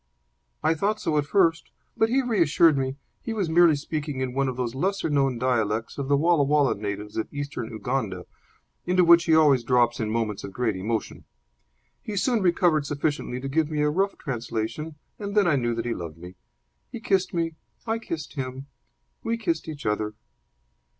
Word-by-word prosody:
"I 160 +1 +3
thought 205 +7 -1
so 155 - -1
at 145 - -2
first. 170 -2 +2 0.3
But 225 - +2
he 265 +3 +2
reassured 170 - +4
me. 135 -1 -1 0.3
He 230 - -4
was 195 -7 -1
merely 170 -1 +6
speaking 145 -1 -4
in 130 -1 -2
one 135 +1 +1
of 130 - -2
the 125 - -1
lesser 160 +9 -1
known 135 -3 +2
dialects 115 -2 -1
of 140 - -3
the 140 0 +3
Walla 165 +1 +3
Walla 145 -1 +3
natives 105 0 -5
of 110 - -3
Eastern 140 -5 -5
Uganda, 110 -5 -3 0.6
into 180 0 +3
which 170 0 +7
he 160 - +4
always 145 -6 +5
drops 120 -1 +2
in 110 -2 -1
moments 110 -2 -2
of 100 - -7
great 115 -3 0
emotion. 110 +4 -3 0.8
He 210 -2 -5
soon 235 +2 +1
recovered 170 -5 +2
sufficiently 145 -3 -2
to 135 - -4
give 155 +2 +1
me 150 -1 0
a 150 - +2
rough 195 +5 0
translation, 120 +4 -4 0.2
and 205 0 -4
then 205 - +5
I 160 - +3
knew 120 -3 0
that 115 0 -3
he 120 - -1
loved 85 -5 -7
me. 90 +2 -10 0.6
He 235 - -6
kissed 190 -4 +1
me. 165 -2 -1 0.3
I 225 0 -1
kissed 165 -8 -6
him. 130 -1 -5 0.6
We 230 0 -1
kissed 170 -8 -2
each 150 -3 -7
other." 105 0 -1
145 Hz, 190 wpm, -25 LUFS, 120-170 Hz, 0.8 s, which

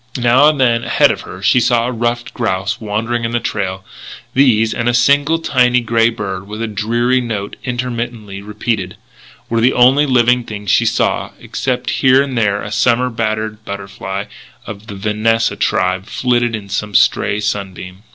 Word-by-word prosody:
Now 125 +4 +4
and 150 -2 -2
then, 120 -3 +2
ahead - - +3
of - - -4
her, 95 +1 -10
she 105 +5 +4
saw 120 -1 +2
a 125 - -2
ruffed 120 0 -2
grouse 100 -3 -2
wandering 115 +3 -2
in 115 0 -2
the 120 - +1
trail. 95 -4 -3 0.5
These, 115 -5 +3
and 120 0 -1
a 120 - +1
single 145 +5 +3
tiny 125 -6 +2
grey 115 -1 +2
bird 95 -4 -5
with 105 +1 -7
a - - -2
dreary 120 +4 0
note 110 -4 -4
interminably 120 -5 -4
repeated, 105 -2 -3 0.5
were 115 0 0
the 125 +3 +3
only 135 +4 +4
living 125 -1 +3
things 105 -4 -4
she - - +3
saw - - 0
except 125 -1 -3
here 130 +1 +5
and 135 -2 -5
there 105 -3 0
a 105 - -6
summer 120 +3 +2
battered 110 -1 -3
butterfly 100 -1 -6 0.4
of 105 +1 -9
the 100 - -7
Vanessa 110 +3 0
tribe 90 +1 0
flitting 120 -2 0
in 105 -2 -8
some 100 +1 -4
stray 100 - +3
sunbeam. 95 -3 -4
115 Hz, 170 wpm, -16 LUFS, 105-125 Hz, 0.5 s, here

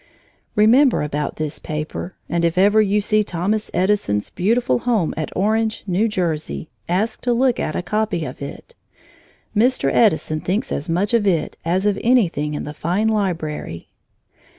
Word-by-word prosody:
Remember 235 - +5
about 150 0 -3
this 155 -1 -4
paper, 155 +4 -5
and 170 0 -1
if 170 +1 +1
ever 205 +3 +5
you 210 0 +2
see 215 +1 +2
Thomas 200 +4 -2
Edison's 180 - 0
beautiful 205 - +1
home 220 -9 0
at 155 - -4
Orange, 220 +3 0
New 195 +3 +1
Jersey, 165 -6 -3 0.2
ask 200 +7 0
to 245 - 0
look 250 0 +2
at 155 - -2
a - - -2
copy 210 -4 -1
of 125 - -8
it. 140 - -8 0.8
Mr. 225 - +2
Edison 160 -7 +2
thinks 200 +10 -2
as 145 - -3
much 190 +6 0
of 220 -3 +3
it 170 -5 0
as 180 +4 0
of 205 -1 +1
anything 170 - +2
in - - -4
the 150 - -6
fine 180 +8 0
library. 165 - -3
190 Hz, 160 wpm, -21 LUFS, 155-215 Hz, 0.8 s, Remember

